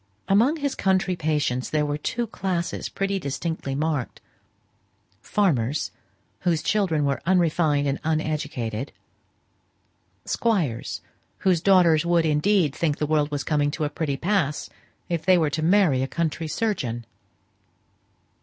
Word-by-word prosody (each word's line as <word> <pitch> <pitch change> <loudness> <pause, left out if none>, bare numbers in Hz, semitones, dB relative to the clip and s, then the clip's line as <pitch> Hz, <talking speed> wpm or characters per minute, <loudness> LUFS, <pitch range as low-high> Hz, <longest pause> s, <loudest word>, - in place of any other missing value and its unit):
Among 230 +10 +4
his 285 -3 -1
country 190 -1 +1
patients 150 -6 -1
there 150 -1 +1
were 145 0 -1
two 235 +9 -2
classes 185 -5 -3
pretty 195 0 -1
distinctly 140 -2 -3
marked: 150 -3 -2 1.0
farmers, 150 - 0 0.5
whose 165 -3 0
children 180 -8 +1
were 140 -3 -1
unrefined 160 -5 +2
and 140 - -1
uneducated; 150 -6 -2 1.3
squires, 180 - -1 0.4
whose 180 -4 +3
daughters 175 -5 +5
would, 170 -1 +2
indeed, 155 +1 +2
think 150 -2 0
the 150 - 0
world 150 -1 +1
was 145 -2 -3
coming 145 -1 +1
to 155 +1 -3
a 150 - 0
pretty 145 -2 -2
pass, 170 -4 -1 0.4
if 170 -2 -2
they 185 +2 +5
were 155 -3 +1
to 150 +3 -2
marry 170 -6 +3
a 135 - 0
country 165 +2 -2
surgeon. 150 - -2
155 Hz, 130 wpm, -24 LUFS, 145-185 Hz, 1.3 s, daughters